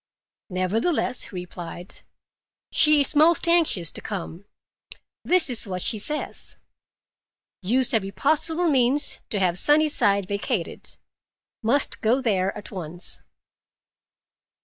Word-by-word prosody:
"Nevertheless," 225 Hz, -, 0 dB
he -, -, -13 dB
replied, 180 Hz, -1 st, -9 dB, 0.7 s
"she 300 Hz, -1 st, +5 dB
is 280 Hz, -, +5 dB
most 325 Hz, +3 st, +4 dB
anxious 320 Hz, -, +2 dB
to -, -, -7 dB
come. 190 Hz, -2 st, -7 dB, 0.8 s
This 360 Hz, -3 st, +2 dB
is 240 Hz, -4 st, -4 dB
what 185 Hz, -2 st, -4 dB
she 215 Hz, -, 0 dB
says. 300 Hz, +8 st, -3 dB, 1.0 s
'Use 245 Hz, +7 st, +2 dB
every 200 Hz, -4 st, +1 dB
possible 320 Hz, -, +1 dB
means 275 Hz, 0 st, +1 dB
to 210 Hz, -, -2 dB
have 180 Hz, -1 st, +1 dB
Sunnyside 295 Hz, -11 st, +3 dB
vacated. 200 Hz, -1 st, -4 dB, 0.6 s
Must 250 Hz, +5 st, +1 dB
go 230 Hz, +4 st, +2 dB
there 195 Hz, -7 st, 0 dB
at 210 Hz, -, -10 dB
once. 175 Hz, -2 st, -6 dB
225 Hz, 110 wpm, -23 LUFS, 185-295 Hz, 1.0 s, she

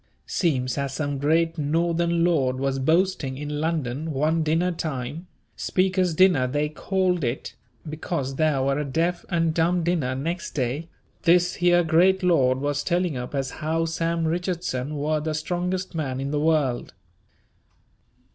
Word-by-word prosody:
Seems 130 Hz, -6 st, 0 dB
as 140 Hz, -1 st, -3 dB
some 145 Hz, -1 st, -2 dB
great 165 Hz, +3 st, +1 dB
Northern 170 Hz, +3 st, +1 dB
lord 140 Hz, -7 st, +2 dB
was 135 Hz, 0 st, -1 dB
boasting 160 Hz, -2 st, +1 dB
in 150 Hz, +1 st, -4 dB
London 155 Hz, -2 st, -2 dB
one 155 Hz, +4 st, +1 dB
dinner 165 Hz, +4 st, +1 dB
time, 155 Hz, 0 st, -4 dB, 0.3 s
Speaker's 185 Hz, -2 st, +1 dB
dinner 175 Hz, -8 st, +4 dB
they 145 Hz, +3 st, -1 dB
called 180 Hz, +1 st, 0 dB
it 120 Hz, +1 st, -3 dB, 0.3 s
because 150 Hz, -3 st, -3 dB
there 155 Hz, -4 st, +2 dB
were 135 Hz, +1 st, +1 dB
a -, -, 0 dB
deaf 165 Hz, +5 st, -1 dB
and 165 Hz, -2 st, +1 dB
dumb 170 Hz, +2 st, +1 dB
dinner 160 Hz, -7 st, 0 dB
next 165 Hz, +6 st, -4 dB
day, 140 Hz, +5 st, -2 dB, 0.3 s
this 175 Hz, +1 st, +4 dB
here 175 Hz, 0 st, +3 dB
great 180 Hz, +4 st, +3 dB
lord 135 Hz, -8 st, +3 dB
was 145 Hz, +1 st, -1 dB
telling 175 Hz, -3 st, 0 dB
up 125 Hz, +3 st, -5 dB
as 135 Hz, -1 st, -2 dB
how 160 Hz, +2 st, 0 dB
Sam 165 Hz, 0 st, -1 dB
Richardson 165 Hz, -5 st, -2 dB
were 150 Hz, +2 st, 0 dB
the 155 Hz, 0 st, -2 dB
strongest 180 Hz, +4 st, -2 dB
man 135 Hz, -5 st, -3 dB
in 135 Hz, +1 st, -3 dB
the 150 Hz, -, 0 dB
world. 150 Hz, -5 st, 0 dB
160 Hz, 150 wpm, -24 LUFS, 140-175 Hz, 0.3 s, dinner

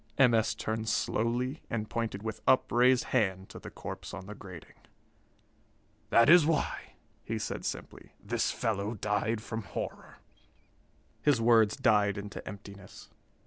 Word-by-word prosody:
M. 130 Hz, -4 st, +6 dB
S. 110 Hz, -1 st, +2 dB
turned 110 Hz, +1 st, -3 dB
slowly 120 Hz, +6 st, -1 dB
and 110 Hz, -2 st, -2 dB
pointed 110 Hz, -3 st, -3 dB
with 110 Hz, -1 st, -5 dB
upraised 125 Hz, 0 st, +4 dB
hand 95 Hz, -6 st, +1 dB
to -, -, -9 dB
the -, -, -9 dB
corpse -, -, -7 dB
on 95 Hz, -1 st, -8 dB
the 105 Hz, -, -8 dB
grating. 95 Hz, -5 st, -11 dB, 1.4 s
"That 115 Hz, -, +5 dB
is 170 Hz, +1 st, +8 dB
why," 155 Hz, -1 st, -1 dB, 0.3 s
he -, -, -3 dB
said -, -, -4 dB
simply, -, -, -6 dB
"this -, -, -1 dB
fellow 105 Hz, 0 st, -2 dB
died 105 Hz, +2 st, -1 dB
from 110 Hz, -1 st, -4 dB
horror." 95 Hz, -, -7 dB, 1.0 s
His 145 Hz, -5 st, +3 dB
words 115 Hz, -2 st, +4 dB
died 105 Hz, -2 st, +3 dB
into 100 Hz, 0 st, -7 dB
emptiness. 100 Hz, -1 st, -11 dB
110 Hz, 140 wpm, -30 LUFS, 100-120 Hz, 1.4 s, is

